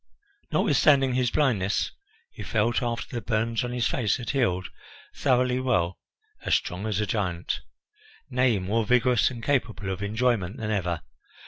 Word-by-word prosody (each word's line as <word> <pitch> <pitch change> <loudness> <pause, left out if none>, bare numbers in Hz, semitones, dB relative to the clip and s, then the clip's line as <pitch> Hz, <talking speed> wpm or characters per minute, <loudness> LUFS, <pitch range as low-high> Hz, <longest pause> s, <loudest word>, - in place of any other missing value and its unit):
Notwithstanding 135 -4 +4
his 125 -1 +2
blindness, 110 -9 +1 0.4
he - - -10
felt, 115 +2 +1
after 120 0 -3
the 120 - -2
burns 115 +1 0
on 120 - -3
his 125 -1 0
face 120 -4 0
had 125 - -4
healed, 95 -10 0 0.5
thoroughly 125 -2 +2
well, 95 -9 0 0.4
as - - +3
strong 95 +5 -2
as 105 -2 -1
a 105 - +1
giant 90 -4 -2 0.7
nay, 125 -4 +2
more 100 +5 0
vigorous 125 +2 +3
and 120 -3 -8
capable 115 -8 -1
of 95 +1 -5
enjoyment 110 -1 0
than 110 -3 -3
ever. 90 -5 -1
115 Hz, 150 wpm, -26 LUFS, 100-125 Hz, 0.7 s, Notwithstanding